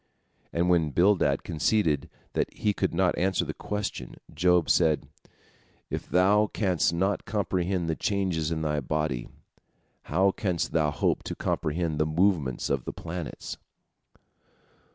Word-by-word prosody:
And 85 +1 +1
when 85 -3 +3
Bildad 85 -4 +3
conceded 80 -2 +1 0.2
that - - 0
he 105 -1 0
could - - 0
not 90 +1 +2
answer 95 +1 +1
the - - -4
question, 105 0 -4 0.2
Job 90 +1 +3
said, 80 -3 +3 0.8
"If - - -4
thou 100 +4 +4
canst 95 -7 +1
not 95 +4 0
comprehend 95 -4 -1
the 80 - 0
changes 95 -6 -1
in 80 -1 -2
thy 75 -1 0
body, 70 -3 -2 0.8
how 95 +5 +3
canst 90 -4 -2
thou 80 -2 +2
hope 75 - 0
to - - -4
comprehend 80 0 -1
the 75 - +2
movements 80 -5 +1
of 70 -3 -1
the - - -4
planets?" 85 -1 -6
85 Hz, 135 wpm, -27 LUFS, 75-95 Hz, 0.8 s, thou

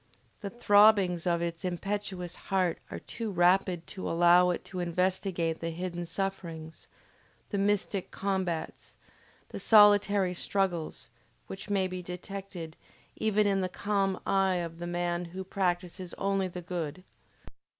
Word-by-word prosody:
The 200 - -5
throbbings 205 -5 +4
of 170 -1 +1
its 170 -1 -4
impetuous 185 -1 -3 0.2
heart 185 -3 +1
are - - -5
too 230 -2 -5
rapid 180 -1 +2
to 190 - -4
allow 175 +1 +5
it 175 - -2
to 185 - -6
investigate 175 -1 0
the 165 - -3
hidden 175 +1 -4
sufferings, 165 -3 -5 0.6
the 200 - 0
mystic 200 -1 0
combats, 185 -5 -3 0.5
the - - -6
solitary 205 -3 +5
struggles, 175 -7 -2 0.4
which 195 +2 -8
may 195 -2 +2
be 185 0 -4
detected 180 -2 -7 0.4
even 215 -1 +2
in 195 -1 +2
the 185 - -1
calm 195 -1 0
eye 195 -1 +2
of 170 -1 -4
the 175 - -4
man 175 0 -1
who 185 +3 -6
practices 180 -1 -2
only 195 -1 0
the 180 -1 -7
good. 175 -1 -4
185 Hz, 135 wpm, -29 LUFS, 175-195 Hz, 0.6 s, allow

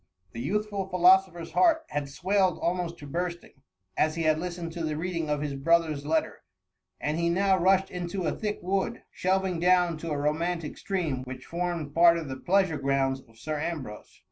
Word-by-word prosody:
The 115 - -8
youthful 200 - -2
philoso 185 +1 +5
pher'^s 170 -1 -9
heart 330 -3 +4
had 145 -1 -3
swelled 185 +5 +1
almost 175 -1 -2
to 145 - -10
bursting, 170 -1 -5 0.3
as 155 +1 +1
he 165 - -1
had 155 0 +3
listened 175 -1 -5
to 170 -1 -4
the 155 -1 -2
reading 165 -2 -2
of 150 -1 0
his 145 -2 -3
brother^s 155 0 +1
letter, 160 +1 0 0.6
and 150 +2 -1
he 170 0 +1
now 190 +2 +3
rushed 190 +2 +3
into 180 +1 -3
a 155 - +1
thick 210 -1 -3
wood, 190 +1 -1
shelving 185 -1 0
down 180 -1 +3
to 165 - -5
a 150 - -1
romantic 160 +2 -1
stream, 160 -10 -2
which 130 0 -8
formed 170 -4 -3
part 170 +1 +6
of 160 -4 -5
the 130 - -5
pleasure 185 -1 +1
grounds 135 -1 0
of 115 - -21
Sir 155 +5 -4
Ambrose. 145 -10 -6
170 Hz, 190 wpm, -27 LUFS, 150-185 Hz, 0.6 s, part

